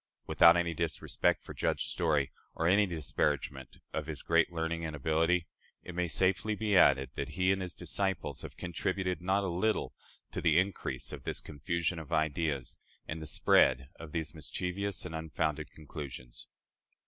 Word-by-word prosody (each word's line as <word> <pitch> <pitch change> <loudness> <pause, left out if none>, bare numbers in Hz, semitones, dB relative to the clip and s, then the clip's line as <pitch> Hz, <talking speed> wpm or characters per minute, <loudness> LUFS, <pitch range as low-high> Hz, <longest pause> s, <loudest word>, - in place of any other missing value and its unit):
Without 85 +1 +7
any 85 -1 +1
disrespect 85 -1 0
for - - -8
Judge - - 0
Story, 75 -6 +1 0.2
or 80 - -1
any 100 +3 +5
disparagement 75 -5 -1 0.2
of 75 -1 -2
his 75 -2 -4
great 85 +1 +3
learning 85 0 -2
and 80 -2 -3
ability, 80 +4 +2 0.4
it 90 - -7
may 90 0 0
safely 95 +5 +1
be 105 -1 0
added 65 -7 +5
that - - -3
he 90 +1 +4
and 95 0 0
his 90 -2 -4
disciples 95 0 -2
have - - -9
contributed 90 +1 -2
not 95 +3 +2
a - - -1
little 95 +5 0 0.4
to - - -3
the 80 -1 +4
increase 95 +2 -1
of - - -6
this - - -2
confusion 85 +3 -2
of 80 -1 -10
ideas 80 -3 0 0.3
and 80 0 -4
the 80 - -5
spread 65 -2 +4
of 80 -2 -8
these 80 -1 -2
mischievous 90 +5 -3
and - - -6
unfounded 80 -1 -2
conclusions. 70 -5 -8
85 Hz, 165 wpm, -32 LUFS, 80-90 Hz, 0.4 s, Without